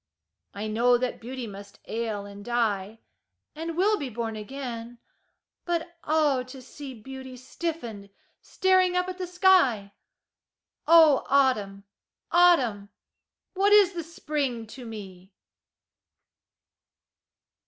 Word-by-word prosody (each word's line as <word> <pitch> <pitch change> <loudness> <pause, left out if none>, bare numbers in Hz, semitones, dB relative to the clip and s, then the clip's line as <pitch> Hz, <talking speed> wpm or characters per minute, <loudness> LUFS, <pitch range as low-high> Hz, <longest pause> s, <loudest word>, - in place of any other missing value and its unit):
I 205 +2 -4
know 235 +3 +3
that 255 0 -3
beauty 250 +1 -6
must 200 -1 -11
ail 220 -3 -3
and 200 0 -10
die, 220 -2 -1 0.5
And 325 +1 -5
will 415 +4 +3
be 275 - -4
born 225 -1 -4
again, 240 +1 -7 0.7
but 345 0 -3
ah, 300 -4 +2
to 255 +1 -10
see 265 +1 -10
Beauty 260 +2 -10
stiffened, 250 -7 -6 0.3
staring 370 -1 +2
up 360 0 0
at 370 0 -6
the 365 - -3
sky! 345 - +3 0.9
Oh, 320 -3 +7
Autumn! 215 -8 +2 0.5
Autumn! 260 - +4 0.6
What 400 +2 +3
is 400 -3 +6
the 345 - -3
Spring 290 -7 -3
to 250 0 -10
me? 190 -3 -10
255 Hz, 110 wpm, -26 LUFS, 220-330 Hz, 0.9 s, Oh